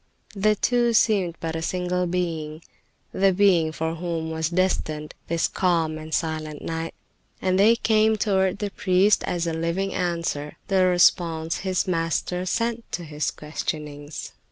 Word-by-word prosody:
The 210 +2 +3
two 240 +2 +2
seemed 200 -6 +3
but 165 -1 -3
a 160 - -2
single 180 +1 -1
being, 165 -3 -3 0.5
the 195 0 +3
being 180 -4 +3
for 160 +1 -2
whom 165 -1 -3
was 160 -1 -1
destined 165 -4 -1
this 165 0 +1
calm 165 -4 0
and 155 0 -9
silent 155 -2 -2
night, 165 0 -4 0.4
and 185 0 +1
they 220 +4 +6
came 220 -1 +3
toward 190 -2 +1
the 205 -1 -3
priest 195 +1 +3
as 175 -1 -1
a 165 - -1
living 170 +4 -1
answer, 170 -5 -2
the 190 -2 +4
response 170 -2 +3
his 185 -1 -1
Master 180 +1 -1
sent 230 +3 -2
to 175 - -2
his 150 -1 -2
questionings. 150 -1 -5
175 Hz, 150 wpm, -24 LUFS, 160-190 Hz, 0.5 s, they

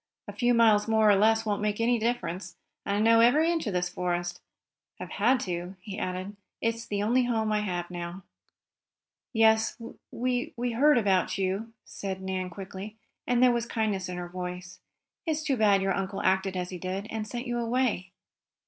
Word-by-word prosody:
"A - - -7
few 245 -1 +2
miles 220 -2 +5
more 220 -1 +4
or - - +5
less 220 +2 +3
won't 205 -1 -1
make 210 0 -1
any 235 +1 +2
difference, 220 -5 -2 0.3
and 200 - +1
I - - +1
know 230 +1 +5
every 300 +9 +5
inch 330 -7 -1
of 205 - -1
this 180 0 0
forest. 175 -1 -3 0.6
I've - - -7
had 245 +6 +3
to," 175 +1 -4
he 195 +2 -7
added. 185 +2 -4 0.2
"It's 230 0 -2
the 205 0 -1
only 245 +4 +3
home 220 -3 0
I 210 - +2
have 180 -4 -3
now." 175 +1 -6 1.1
"Yes, 220 -1 +3 0.3
we 250 +1 -1
we 245 0 -1
heard 285 +5 +4
about 195 -5 +2
you," 195 +4 -2
said 190 -1 -5
Nan 190 -1 -3
quickly, 195 +3 -8 0.3
and 245 0 +3
there 250 - +7
was 235 -1 -1
kindness 210 -6 -1
in 180 - -5
her 175 0 -5
voice. 180 0 -7 0.5
"It's 315 -1 0
too 280 -3 +1
bad 205 -4 +3
your 195 0 +1
uncle 195 0 -3
acted 190 0 +1
as 180 0 -3
he 180 - -6
did, 190 +3 -4
and 220 -1 -3
sent 240 +3 -5
you 240 -1 -2
away." 235 -6 0
210 Hz, 190 wpm, -28 LUFS, 185-230 Hz, 1.1 s, there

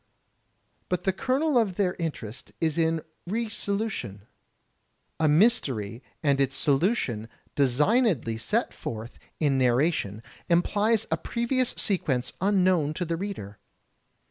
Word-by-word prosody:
But 180 - -1
the 190 - +1
kernel 265 - +2
of 200 -6 0
their 185 -2 +1
interest 130 -9 -5
is 165 0 0 0.5
re 225 +4 -1
solution. 200 - -3 1.0
A 160 - +3
mystery 140 - +2 0.2
and 140 -2 +3
its 135 -1 +1
solution 135 - +1 0.2
designedly 145 - +2
set - - 0
forth 115 +2 -7 0.2
in 140 -4 +2
narra 130 +6 +4
tion, 105 - -4 0.3
implies 210 +6 +2
a 160 - +2
previous 240 +7 -1
sequence 135 -10 0
unknown 185 -6 +2
to 180 - -2
the 165 0 -1
reader. 165 - -6
165 Hz, 115 wpm, -27 LUFS, 130-205 Hz, 1.0 s, narra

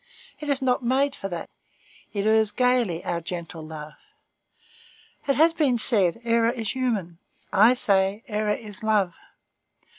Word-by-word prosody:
It 300 - -6
is 275 -1 0
not 255 +1 +1
made 270 +3 +1
for 195 - -6
that; 175 -2 -5 0.6
it 200 -1 -2
errs 220 0 +4
gayly, 245 -8 +1
our 170 -1 -2
gentle 170 -1 -7
love. 155 -1 -9 1.3
It 275 - +2
has 325 +2 +4
been 285 -7 +1
said, 205 -5 +4
error 230 0 +2
is 230 -3 -3
human; 215 -10 -2 0.3
I 215 +5 +6
say, 200 -1 +1
error 210 -1 0
is 210 -1 -8
love. 210 -5 +1
220 Hz, 145 wpm, -25 LUFS, 190-250 Hz, 1.3 s, I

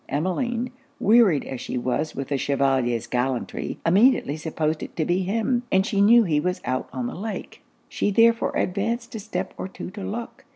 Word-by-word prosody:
Emmeline, 230 - -1 0.3
wearied 210 - +4
as 130 - -6
she - - -4
was 130 +5 -1
with 135 -1 -4
the 140 - 0
Chevalier's 130 -4 +1
gallantry, 125 +1 -2
immediately 190 - +4
supposed 155 0 -2
it - - -7
to 160 - 0
be 175 +3 +1
him, 225 +6 0
and 190 0 +3
she 205 -3 +1
knew 230 +3 +7
he 155 -7 +1
was 180 +3 -1
out 130 0 -2
on 250 - -3
the 245 - -4
lake. 215 +3 -6 0.3
She - - -1
therefore 230 +3 +3
advanced 225 +6 -1
a 225 - -4
step 210 +2 -4
or - - -3
two 190 - -8
to 200 +1 -8
look. 230 +6 -6
185 Hz, 190 wpm, -24 LUFS, 140-225 Hz, 0.3 s, knew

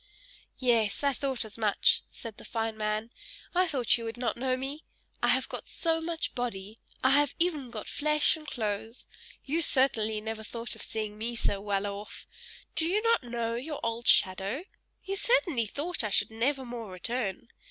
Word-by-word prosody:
"Yes! 230 -2 +2
I 280 -1 +3
thought 265 -3 -2
as 220 +1 -10
much," 210 -2 +4
said 225 -3 -9
the - - -12
fine 225 -1 -2
man. 215 +1 -2 0.4
"I 365 +1 +3
thought 255 -7 +2
you - - -6
would 225 +1 -5
not 240 -3 -1
know 255 +1 0
me. 275 +4 -5 0.4
I - - +2
have - - +3
got - - -7
so 325 -1 +1
much 330 0 -3
body. 220 -4 -4 0.2
I 260 - +5
have 290 0 +3
even 310 -7 0
got 220 -3 -7
flesh 300 0 +2
and 310 -1 -12
clothes. 220 -2 -3 0.4
You 315 +5 0
certainly 225 -7 +6
never 220 0 -5
thought 230 +2 -5
of - - -10
seeing 215 -1 -4
me 235 +2 -2
so 200 -3 +1
well 200 -1 -1
off. 205 +1 -6 0.5
Do 325 0 +2
you 410 +5 +1
not 460 - +3
know 235 -1 -2
your 280 +5 -4
old 230 +1 -2
shadow? 195 - +3 0.4
You 390 - -3
certainly 380 - +3
thought 305 - -1
I 215 - -1
should 205 +1 +2
never 260 +4 0
more 235 -3 -6
return. 215 +2 -3
235 Hz, 185 wpm, -29 LUFS, 215-285 Hz, 0.5 s, certainly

